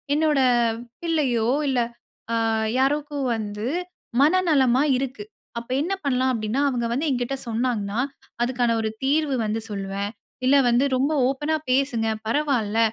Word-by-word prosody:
என்னோட 305 -2 +2 0.6
பிள்ளையோ 275 -9 +1 0.2
இல்ல 260 -2 +1 0.5
அ - - +2 0.4
யாருக்கோ 290 +2 0 0.2
வந்து 210 +1 -4 0.5
மன 305 +4 +5 0.2
நலமா 265 -3 +4 0.2
இருக்குது. 250 -5 -4 0.3
அப்போ 235 +2 -10
என்ன 365 +5 -1
பண்ணலாம் 260 -1 +2
அப்படின்னா, 225 +3 -1
அவங்க 240 -3 -1
வந்து 280 +6 -1
என்கிட்ட 250 +1 -1
சொன்னாங்கன்னா, 225 -2 -1 0.4
அதுக்கான 240 -1 +1
ஒரு 220 - -1
தீர்வு 285 0 +2
வந்து 215 +1 -1
சொல்வேன். 200 0 -3 0.4
"இல்ல 270 - +5
வந்து 240 +4 +3
ரொம்ப 275 +4 +1 0.2
ஓப்பன்னா 295 +4 0 0.2
பேசுங்க 255 -4 +1 0.2
பரவால்ல. 230 -5 +1
255 Hz, 130 wpm, -24 LUFS, 225-280 Hz, 0.6 s, மன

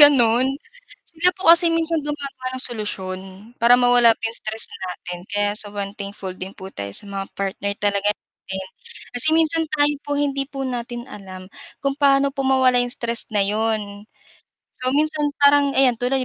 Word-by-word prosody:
gano'n. 255 -4 +6 0.6
Sila 335 +2 +2
po 335 -3 +6
kasi 340 0 +5
minsan 330 -1 +1
gumagawa 290 -1 -4
sila 255 -1 -7
ng 255 - -8
solusyon 200 -5 -5 0.4
para 240 +1 +6
mawala 245 -2 +5
po - - -47
'yong 225 +1 -1
stress 220 +1 -3
natin. 180 -1 -6
Kaya, 205 0 0
sobrang 205 -2 -4
thankful 200 -2 -6
din 185 +1 -7
po 190 0 -9
tayo 100 0 -6
sa - - -2
mga 195 -1 -4
partner 195 +1 -2
talaga 205 0 +1
natin. 190 -2 -9 0.5
Kasi 250 +6 +3
minsan 325 0 +3
tayo 295 -1 +2
po 290 0 -2
hindi 275 -1 0
po 275 -2 -5
natin 240 -1 -4
alam 185 -2 -10 0.4
kung 275 0 0
paano 275 0 +4
po 275 - -4
mawala 260 -2 +4
'yong 245 0 -1
stress 235 -3 -1
na 205 -2 +3
'yon. 210 -1 -1 0.7
So, 255 0 -2
minsan 300 +1 +1
parang 285 0 +5
ayan 260 -3 +5
tuloy 255 +2 0
245 Hz, 175 wpm, -21 LUFS, 205-280 Hz, 0.7 s, gano'n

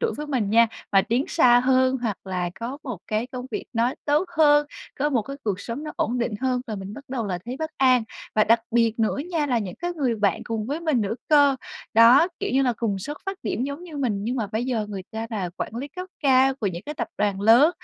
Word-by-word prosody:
tuổi 465 - 0
với 300 - -5
mình 250 -9 -1
nha, 230 +1 +6 0.3
mà 195 -1 +6
tiến 245 +8 0
xa 245 -7 +5
hơn 260 0 +3
hoặc 215 -5 -1
là 180 -2 -2
có 255 +5 -4
một 245 - -5
cái 215 +2 -1
công 255 0 -7
việc - - -4
nó 235 +1 +1
tốt 300 +4 +2
hơn, 295 -1 +5 0.3
có 295 +2 +1
một 245 -6 +1
cái 275 +6 -7
cuộc 200 -3 -1
sống 245 +6 -5
nó 305 - -5
ổn 245 +3 0
định 235 -2 -1
hơn 255 -1 0
là 220 - -4
mình 195 +1 -7
bắt 280 - -10
đầu 250 -4 -3
là 180 -3 -2
thấy 250 +2 -5
bất 315 0 -3
an, 255 -3 +4 0.3
và 215 - +4
đặc 230 +1 +4
biệt 230 -1 +2
nữa 220 -1 +1
nha 320 -4 0
là 250 -4 +1
những 190 -5 -5
cái 350 +1 -3
người 260 -6 +1
bạn 200 -4 +1
cùng 220 -2 -3
với 290 +6 -3
mình 310 -7 +1
nữa 210 +1 -1
cơ. 285 -3 +5 0.4
Đó, 240 +9 +7
kiểu - - -1
như 270 +1 +3
là, 250 -2 +2
cùng 205 -4 -1
xuất 290 +10 -6
phát 390 -1 -3
điểm 245 - -2
giống 280 +4 -5
như 325 -4 -9
mình 220 -8 -1
nhưng 245 +4 -1
mà 225 -4 -1
bây 220 +4 -2
giờ 235 -5 -1
người 195 -2 -5
ta 220 +1 -4
là 195 -6 -3
quản - - -4
lý 270 +4 -4
cấp 365 +5 -7 0.2
cao 265 -1 +4
của 240 -6 -3
những 175 -2 -3
cái 300 - -4
tập 315 - -3
đoàn 200 -2 0
lớn, 235 +9 +6
245 Hz, 260 wpm, -24 LUFS, 215-280 Hz, 0.4 s, Đó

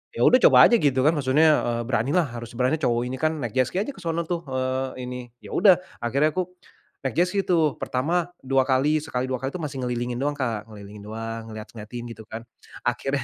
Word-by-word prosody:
ya - - -3
sudah 255 - +6
coba - - +8
saja 235 - +4
gitu 135 -3 +2
kan 155 - +6
maksudnya, 145 +3 +3 0.2
eee, 120 0 -1
beranilah, 130 +8 +2
harus 120 0 -7
berani 130 +5 +1
cowok 120 -4 +1
ini 130 +1 -4
kan, 155 +2 +1
naik 120 -5 -3
jet 130 -1 +3
ski 185 - -2
aja 285 - -5
ke - - -13
sono 165 0 -1
tuh, 170 -1 -2
eee, 130 0 -2
ini. 125 0 -5 0.2
Ya - - -10
udah 190 -1 +7 0.3
akhirnya 140 +6 +2
aku 185 -1 -1 0.6
naik 130 - -2
jet 175 +2 +4
ski 200 - +1
tuh. 160 -5 +2
Pertama, 165 +7 0 0.2
2 135 0 +2
kali 140 +4 +2
sekali, 125 -4 -2
2 130 - -1
kali 135 - -1
itu 180 - -4
masih 135 -3 -4
ngelilingin 120 0 -2
doang 145 +1 0
Kak, 115 -6 -2
ngelilingin 105 -1 -11
doang, 115 +1 -5
ngelihat-ngelihatin 110 +2 -8
gitu 110 - -12
kan, 110 +1 -7 0.4
akhirnya 125 +3 -1
130 Hz, 220 wpm, -24 LUFS, 120-155 Hz, 0.6 s, coba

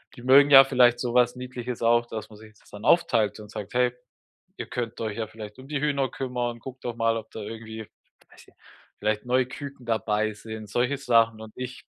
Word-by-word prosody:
die 120 - -12
mögen 140 +2 +6
ja 135 0 +11
vielleicht 125 -2 +4
so 120 -1 -2
was 125 0 +3
Niedliches 125 -1 -6
auch, 120 +1 +3
dass 110 -2 -6
man 105 - -14
sich 110 -1 -15
das - - -23
dann 105 +1 -9
aufteilt 115 -12 +3
und 105 - -11
sagt: 100 +2 -7
„Hey, 125 0 +2 0.7
ihr - - -5
könnt 120 -2 -5
euch 110 -2 -3
ja 110 - -2
vielleicht 110 0 -10
um 130 +1 -12
die 150 -2 -2
Hühner 140 -2 0
kümmern. 125 -2 -3
Guckt 130 +1 -10
doch 120 -1 -4
mal, 115 0 +1
ob 110 -1 -7
da 110 - -7
irgendwie“, 110 0 -8 0.4
weiß - - -18
nicht, - - -24 0.4
„vielleicht 105 0 -1
neue 125 0 +2
Küken 135 -1 -9
dabei 110 -1 0
sind,“ 110 -1 -9
solche 125 +3 0
Sachen 115 -4 +3
„und 110 -1 -10
ich 125 0 -7
120 Hz, 215 wpm, -26 LUFS, 110-125 Hz, 0.7 s, ja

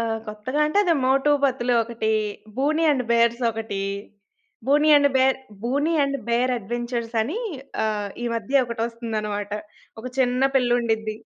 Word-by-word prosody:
ఆహ్, 225 -1 -1
కొత్తగా 215 +7 -3
అంటే 305 +7 +1
అది 350 - +3
'మోటు 270 +3 +3
పతులు' 250 -2 +1
ఒకటి, 225 -1 -2 0.5
'బూనీ 305 +5 +1
అండ్ 265 -4 +1
బేర్స్' 235 +1 +3
ఒకటి. 220 -3 -4 0.9
'Boonie 295 +3 +4
and 285 0 +5
bear', 265 0 +3 0.2
'Boonie 285 +7 0
and 275 0 -1
bear' 245 +2 +2
adventures 235 +2 -4
అని 300 - -3 0.5
ఆహ్, 210 -2 -1 0.2
ఈ - - 0
మధ్య 245 +5 +2
ఒకటొస్తుందన్నమాట. 225 -3 -3 0.5
ఒక 240 - -8
చిన్న 250 0 +2
పిల్లండిద్ది. 235 -4 +1
240 Hz, 140 wpm, -23 LUFS, 225-265 Hz, 0.9 s, అండ్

